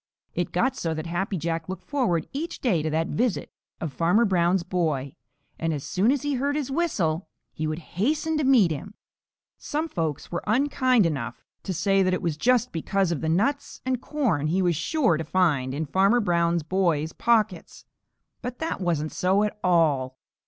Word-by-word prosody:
It - - -2
got 260 0 +1
so 165 -9 -2
that 155 +1 -4
Happy 185 +3 -2
Jack 165 +1 -3
looked 190 - -5
forward 235 - 0
each 310 +5 -4
day 195 - +1
to 155 - -1
the 160 +1 0
visit 235 -1 -1 0.3
of 160 -4 -4
Farmer 180 +8 +3
Brown's 180 -2 +2
boy, 160 -7 -1 0.5
and 165 -1 0
as 140 - -5
soon 200 +7 +2
as 280 -1 0
he 290 -1 0
heard 280 +2 0
his 280 -3 -2
whistle, 185 - 0 0.2
he 155 - -3
would 155 0 -2 0.2
hasten 310 +6 +1
to - - +1
meet 245 -10 +5
him. 160 +8 -6 0.6
Some 310 +2 -2
folks 160 - -3
were 175 - -2
unkind 255 -1 +3
enough 130 -7 -3 0.2
to - - -4
say 195 +4 +2
that 185 -1 +2
it - - -4
was 165 -3 0
just 245 +7 +2
because 185 +2 0
of 165 - -2
the 160 - -1
nuts 230 - 0
and 260 -1 -1
corn 215 - 0
he 185 +4 +1
was 175 -2 +2
sure 260 - +1
to 160 - -3
find 155 -6 +1
in 150 +4 -2
Farmer 195 - +3
Brown's 170 -5 +1
boy's 160 -3 0
pockets, 220 -6 0 0.6
but 250 0 -5
that 320 -9 -3
wasn't 160 -4 0
so 190 +3 +2
at 210 - -1
all. 145 -7 +2
180 Hz, 190 wpm, -25 LUFS, 160-245 Hz, 0.6 s, meet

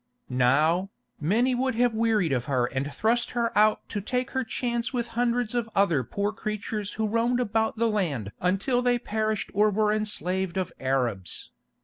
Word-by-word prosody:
Now, 155 +9 +3 0.3
many 225 - +2
would 255 0 0
have 240 0 +2
wearied 220 -8 +2
of 125 -2 -1
her 130 -3 +1
and 135 +3 -3
thrust 235 +8 +1
her 235 -1 0
out 215 +1 +3
to 205 - -3
take 250 +5 -2
her 260 -1 0
chance 235 0 -2
with 240 -3 -2
hundreds 240 0 0
of 235 -2 -1
other 170 -9 +3
poor 200 - -2
creatures 215 -1 -4
who 220 0 -1
roamed 230 +3 +1
about 220 -1 0
the 230 +1 +2
land 155 - -1
until 195 +8 +1
they 245 0 +2
perished 220 -2 -2
or 210 +2 +4
were 210 +1 +2
enslaved 190 -3 -1
of 185 - -2
Arabs. 125 -9 -2
215 Hz, 170 wpm, -26 LUFS, 180-235 Hz, 0.3 s, or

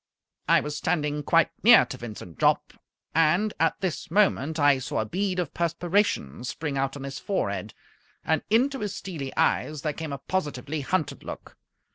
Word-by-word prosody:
I - - +5
was 150 0 -4
standing 150 -3 -1
quite 165 +3 +3
near 235 +2 +8
to - - -7
Vincent 105 -8 -9
Jopp, - - +2 0.4
and 170 +7 +3
at 165 0 +2
this 180 -2 -3
moment 160 -5 +2
I 145 -2 +5
saw 130 - -4
a - - -2
bead 185 - -1
of 175 -5 -2
perspiration 170 - 0
spring 145 +3 -4
out 135 +1 -1
on 140 - -8
his 140 0 -5
forehead, 200 - -2 0.5
and - - +2
into 260 +5 +2
his 210 -3 -3
steely 150 -8 -5
eyes 150 -2 +1
there 150 -2 -1
came 160 0 -6
a 140 - -3
positively 150 -2 -3
hunted 160 +2 -2
look. - - -9
155 Hz, 170 wpm, -26 LUFS, 140-185 Hz, 0.5 s, near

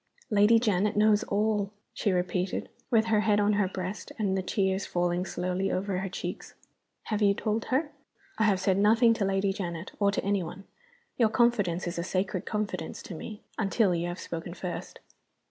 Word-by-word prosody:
"Lady 210 +2 +6
Janet 210 -2 +1
knows 210 0 +5
all!" 205 -1 0 0.2
she 205 - 0
repeated, 180 0 -1 0.2
with 225 -2 +4
her 220 -2 +3
head 210 -1 +3
on 205 0 +3
her 205 -2 +2
breast, 185 +2 -5
and 200 -4 0
the 190 - 0
tears 190 +1 0
falling 175 +1 0
slowly 180 +2 -1
over 190 0 -1
her 195 0 -3
cheeks. - - -6 0.5
"Have 215 -1 -2
you 200 -1 +4
told 220 +1 -1
her?" 290 +3 0 0.5
"I 220 - +4
have 200 -3 +3
said 190 0 +2
nothing 225 +3 +5
to 210 -3 -1
Lady 195 0 +1
Janet 175 -2 -5
or 200 -1 +4
to - - -2
any 200 -1 +1
one. 180 +3 -7 0.6
Your 225 -3 +5
confidence 215 -7 +2
is 175 0 -3
a - - -1
sacred 185 +1 -2
confidence 210 -1 -3
to - - -8
me, 210 +6 -8 0.2
until 200 -2 +2
you 170 0 -1
have 175 +1 -4
spoken 170 +1 -6
first." 180 -2 -6
200 Hz, 185 wpm, -28 LUFS, 185-215 Hz, 0.6 s, Lady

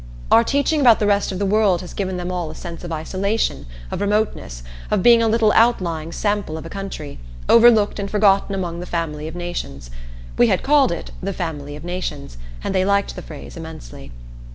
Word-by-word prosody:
Our 230 - +7
teaching 285 +4 +1
about 240 -5 +7
the 210 - 0
rest 200 -1 +2
of 185 - -4
the 200 - -1
world 200 -3 +2
has 180 - -9
given 190 -2 -3
them 180 0 -4
all 175 -3 -3
a 155 - -9
sense 170 0 -8
of 175 - -6
isolation, 190 - -2 0.2
of - - -3
remoteness, 205 - -1 0.3
of - - +1
being 235 -1 +7
a 225 - +2
little 220 -1 +3
outlying 170 -9 +2
sample 205 -5 -2
of 160 - -8
a - - -9
country, 195 -7 -7 0.3
overlooked 225 -3 +5
and 200 0 -3
forgotten 200 -1 +3
among 175 -3 -3
the 180 - -7
family 155 -3 -3
of 160 - -8
nations. 175 - -6 0.5
We 120 - +6
had - - +1
called 280 -3 +4
it 170 - -5
"the 195 +1 -3
family 145 -5 -5
of 150 - -10
nations," 150 - -5 0.2
and - - -2
they 185 -1 +2
liked 200 +1 +1
the - - -7
phrase 70 +1 -10
immensely. - - -10
185 Hz, 200 wpm, -21 LUFS, 160-210 Hz, 0.5 s, Our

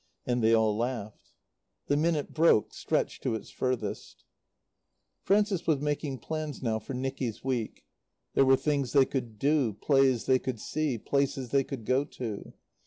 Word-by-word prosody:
And 125 -2 0
they 110 - +5
all 110 -1 +2
laughed. 115 -2 -4 0.6
The 145 - +1
minute 155 -1 0
broke, 160 -9 +4
stretched - - -1
to - - -1
its 110 - -7
furthest. 125 -5 -3 1.0
Frances 200 -3 +1
was 155 -4 +3
making 145 -1 -2
plans 155 +2 -5
now 110 -2 0
for 120 +5 -7
Nicky's 130 -3 -3
week. 125 -5 -3 0.5
There - - +5
were 135 0 +6
things 140 -3 -1
they 140 -2 +6
could 120 -6 -4
do, 140 -2 +2
plays 135 +2 +2
they 130 -1 +4
could 125 -4 -4
see, 150 -2 -1
places 135 +1 -1
they 140 +2 +3
could 130 -5 -7
go 130 +4 +2
to. 115 -7 -6
130 Hz, 160 wpm, -29 LUFS, 115-145 Hz, 1.0 s, were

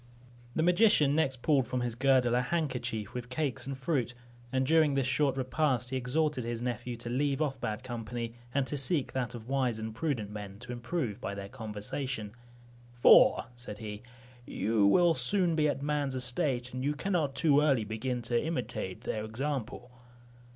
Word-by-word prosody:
The 160 - +2
magician 175 -5 +4
next 135 -5 0
pulled 140 -6 +3
from 125 - -2
his 120 -1 -1
girdle 130 -1 +3
a 125 - +3
handkerchief 125 - -2
with 125 0 -6
cakes 135 -1 -2
and 135 -1 -4
fruit, 130 -3 -1 0.4
and 130 0 +1
during 155 -1 +4
this 135 -2 +1
short 135 +1 +1
repast 130 -1 0
he - - -1
exhorted 130 +2 0
his 120 0 -3
nephew 120 0 -3
to 120 0 -7
leave 140 +2 0
off 135 -4 -1
bad 110 +3 -3
company, 115 -1 -5 0.2
and 140 +1 +1
to 145 +3 -3
seek 140 +1 +1
that 125 -2 -2
of 115 -1 -9
wise 130 -4 0
and 110 0 -5
prudent 115 -5 -2
men, 100 -2 -7
to 125 0 -8
improve 120 - -3
by 100 - -4
their 100 0 -7
conversation; 110 0 -4 0.6
"for," 120 - +6
said 120 -4 -7
he, 105 -1 -7 0.4
"you 110 -3 +1
will 170 - +5
soon 170 +6 +2
be 150 -1 +3
at 140 - -3
man's 145 -2 -1
estate, 125 0 -1
and 130 0 -3
you 145 +2 0
cannot 155 -4 -1
too 145 +2 +4
early 140 -7 +3
begin 115 +3 -3
to 120 +1 0
imitate 155 - -3
their 110 - -3
example." 125 +1 -4
130 Hz, 180 wpm, -30 LUFS, 120-145 Hz, 0.6 s, for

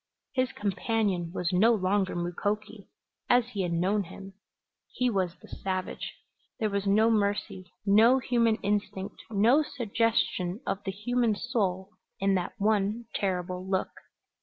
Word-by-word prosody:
His 255 -2 +1
companion 200 -3 -1
was 180 0 -2
no 225 +6 +5
longer 190 -1 +1
Mukoki 205 +4 -3 0.4
as 245 -1 +4
he 205 -5 -3
had 175 -2 -1
known 190 +4 +1
him; 195 +3 -10 0.6
he 250 -1 0
was 185 -4 0
the 180 - -17
savage. 185 -1 -4 0.4
There 215 -2 0
was 200 0 -1
no 215 +3 +4
mercy, 200 -3 -1
no 220 +6 +6
human 235 -3 +2
instinct, 200 -1 -2
no 225 +7 +4
suggestion 230 -8 0
of 195 - -2
the 195 - -1
human 225 +3 0
soul 200 -5 -1 0.3
in 195 0 +2
that 180 -2 -1
one 210 +2 +1
terrible 180 -2 -2
look. 190 0 -1
200 Hz, 135 wpm, -28 LUFS, 190-225 Hz, 0.6 s, no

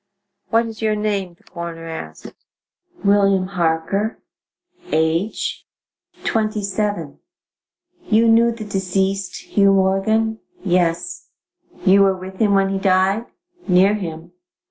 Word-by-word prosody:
"What 230 +1 +3
is 225 -1 -8
your 215 -1 +1
name?" 200 -4 -2
the - - -30
coroner 170 -2 -7
asked. 160 0 -8 0.7
"William 200 -2 +3
Harker." 180 +4 -1 0.7
"Age?" 165 +6 0 0.6
"Twenty 215 -2 -1
seven." 200 -6 -3 0.9
"You 225 +1 +3
knew 230 +1 +5
the 225 -2 -7
deceased, 195 -1 -2
Hugh 200 -1 +5
Morgan?" 220 +4 +1 0.3
"Yes." 180 - 0 0.6
"You 195 +1 +6
were 195 -1 +3
with 185 +1 -9
him 205 -3 +3
when 195 0 +3
he 195 0 -1
died?" 190 +3 +2 0.4
"Near 190 +2 +5
him." 170 -4 -6
195 Hz, 115 wpm, -20 LUFS, 180-215 Hz, 0.9 s, You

